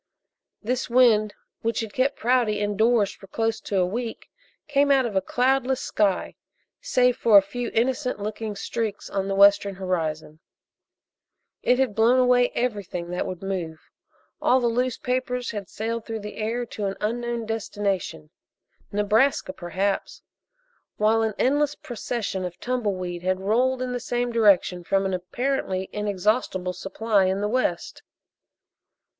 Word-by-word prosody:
This 250 Hz, +4 st, -2 dB
wind 230 Hz, -4 st, +4 dB, 0.3 s
which 230 Hz, +1 st, -1 dB
had 220 Hz, -2 st, -6 dB
kept 265 Hz, +2 st, +1 dB
Prouty 235 Hz, -3 st, +2 dB
indoors 210 Hz, +1 st, +2 dB
for 195 Hz, -, -15 dB
close 225 Hz, +3 st, -1 dB
to 200 Hz, -, -2 dB
a 180 Hz, -, +3 dB
week 230 Hz, +5 st, -5 dB, 0.4 s
came 285 Hz, -1 st, +2 dB
out 270 Hz, -2 st, +4 dB
of 220 Hz, -4 st, -4 dB
a 190 Hz, -, +3 dB
cloudless 260 Hz, +4 st, +1 dB
sky, 200 Hz, -3 st, 0 dB, 0.5 s
save 250 Hz, -, +2 dB
for 220 Hz, -3 st, +6 dB
a -, -, +9 dB
few 240 Hz, +4 st, -4 dB
innocent 250 Hz, +1 st, 0 dB
looking 215 Hz, +1 st, -4 dB
streaks 220 Hz, 0 st, -4 dB
on 195 Hz, -1 st, -1 dB
the 195 Hz, -, -1 dB
western 200 Hz, 0 st, +5 dB
horizon. 160 Hz, -5 st, -3 dB, 1.2 s
It 250 Hz, -, +3 dB
had 260 Hz, -5 st, +1 dB
blown 230 Hz, +4 st, +4 dB
away 250 Hz, -1 st, +4 dB
everything 200 Hz, -7 st, -3 dB
that 180 Hz, -, -2 dB
would 185 Hz, 0 st, -6 dB
move. 175 Hz, -5 st, -5 dB, 0.5 s
All 255 Hz, -, +4 dB
the 245 Hz, -, -1 dB
loose 245 Hz, +1 st, 0 dB
papers 250 Hz, -1 st, -2 dB
had 205 Hz, -4 st, -6 dB
sailed 230 Hz, +1 st, -3 dB
through 225 Hz, -1 st, -4 dB
the 210 Hz, +1 st, -8 dB
air 230 Hz, +3 st, -2 dB
to 215 Hz, -2 st, -5 dB
an 195 Hz, -, -4 dB
unknown 235 Hz, +1 st, -2 dB
destination 200 Hz, -7 st, -3 dB, 0.6 s
Nebraska, 210 Hz, +1 st, +2 dB
perhaps 190 Hz, +3 st, -3 dB, 0.7 s
while 220 Hz, +1 st, +3 dB
an 220 Hz, -2 st, -1 dB
endless 290 Hz, +2 st, +2 dB
procession 225 Hz, -5 st, -4 dB
of 175 Hz, -1 st, -6 dB
tumble 245 Hz, -5 st, -1 dB
weed 175 Hz, -1 st, -5 dB
had 185 Hz, +1 st, 0 dB
rolled 250 Hz, +6 st, +1 dB
in 250 Hz, -, -3 dB
the 245 Hz, -, -2 dB
same 245 Hz, 0 st, -2 dB
direction 200 Hz, -5 st, +3 dB
from 195 Hz, +2 st, +1 dB
an 190 Hz, -, -1 dB
apparently 190 Hz, 0 st, -2 dB
inexhaustible 205 Hz, -2 st, 0 dB
supply 195 Hz, +2 st, 0 dB
in 190 Hz, +1 st, 0 dB
the 205 Hz, -, 0 dB
west. 255 Hz, +4 st, -1 dB
215 Hz, 150 wpm, -25 LUFS, 195-245 Hz, 1.2 s, a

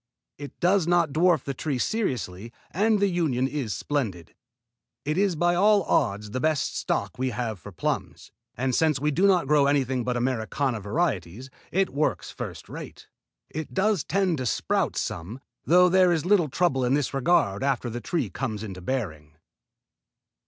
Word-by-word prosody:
It 145 Hz, -1 st, -9 dB
does 180 Hz, -1 st, +3 dB
not 170 Hz, -3 st, +3 dB
dwarf 165 Hz, -2 st, +3 dB
the 140 Hz, -, -3 dB
trees 135 Hz, -1 st, -2 dB
seriously 115 Hz, -, -3 dB, 0.2 s
and 210 Hz, +4 st, +2 dB
the 200 Hz, -, +3 dB
union 155 Hz, -9 st, 0 dB
is 135 Hz, -6 st, -3 dB
splendid. 105 Hz, -, -3 dB, 0.7 s
It 150 Hz, +2 st, 0 dB
is 195 Hz, -1 st, +2 dB
by 175 Hz, +2 st, +2 dB
all 200 Hz, +2 st, +4 dB
odds 105 Hz, -7 st, 0 dB
the 130 Hz, -, -2 dB
best 155 Hz, 0 st, 0 dB
stock -, -, -2 dB
we 130 Hz, 0 st, 0 dB
have 110 Hz, -3 st, -3 dB
for -, -, -10 dB
plums, -, -, -4 dB, 0.3 s
and 130 Hz, +2 st, 0 dB
since 155 Hz, -1 st, +2 dB
we 150 Hz, +2 st, +1 dB
do 185 Hz, +7 st, +3 dB
not 185 Hz, -5 st, +3 dB
grow 145 Hz, 0 st, +4 dB
anything 130 Hz, -3 st, +1 dB
but 125 Hz, +1 st, -1 dB
Americana 120 Hz, 0 st, -1 dB
varieties, 110 Hz, -, -2 dB, 0.2 s
it 190 Hz, +1 st, +1 dB
works 150 Hz, +2 st, -1 dB
first -, -, -7 dB
rate. -, -, -10 dB, 0.4 s
It 155 Hz, +1 st, -6 dB
does 195 Hz, -4 st, +2 dB
tend 185 Hz, -4 st, 0 dB
to 130 Hz, -, -2 dB
sprout -, -, 0 dB
some, 105 Hz, +10 st, -4 dB, 0.3 s
though 180 Hz, +2 st, +6 dB
there 185 Hz, 0 st, +4 dB
is 165 Hz, -1 st, 0 dB
little 180 Hz, -5 st, +3 dB
trouble 135 Hz, -3 st, +1 dB
in 125 Hz, +2 st, +2 dB
this 145 Hz, -1 st, -1 dB
regard 130 Hz, -, +2 dB
after 135 Hz, -3 st, 0 dB
the 120 Hz, +1 st, -5 dB
trees 170 Hz, +5 st, -2 dB
come 120 Hz, -6 st, -3 dB
into 100 Hz, -3 st, -7 dB
bearing." 80 Hz, -, -4 dB
140 Hz, 170 wpm, -26 LUFS, 120-175 Hz, 0.7 s, though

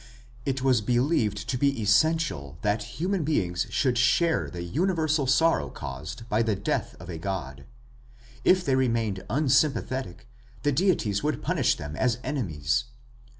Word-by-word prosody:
It 130 Hz, -1 st, -1 dB
was 130 Hz, -4 st, +3 dB
believed 120 Hz, -3 st, +1 dB
to 125 Hz, +1 st, -1 dB
be 140 Hz, -2 st, +1 dB
essential 110 Hz, -, +1 dB
that 105 Hz, +1 st, +1 dB, 0.2 s
human 180 Hz, +2 st, 0 dB
beings 90 Hz, -, 0 dB
should 125 Hz, -4 st, +1 dB
share 165 Hz, +6 st, +2 dB
the 85 Hz, -1 st, -6 dB
universal 155 Hz, -, 0 dB
sorrow 135 Hz, -, +3 dB
caused 75 Hz, -, -7 dB
by 110 Hz, 0 st, +1 dB
the 110 Hz, -2 st, +1 dB
death -, -, -2 dB
of -, -, -10 dB
a 85 Hz, -3 st, -6 dB
god. 70 Hz, -8 st, -5 dB, 0.8 s
If 185 Hz, -1 st, +4 dB
they 135 Hz, -, +2 dB
remained 115 Hz, -7 st, 0 dB
unsympathetic, 135 Hz, -, 0 dB, 0.4 s
the 145 Hz, -, +2 dB
deities 140 Hz, -, +1 dB
would 150 Hz, +1 st, -2 dB
punish -, -, +2 dB
them 75 Hz, +1 st, -6 dB
as 125 Hz, -2 st, +1 dB
enemies. 90 Hz, -, -1 dB
120 Hz, 145 wpm, -26 LUFS, 95-145 Hz, 0.8 s, If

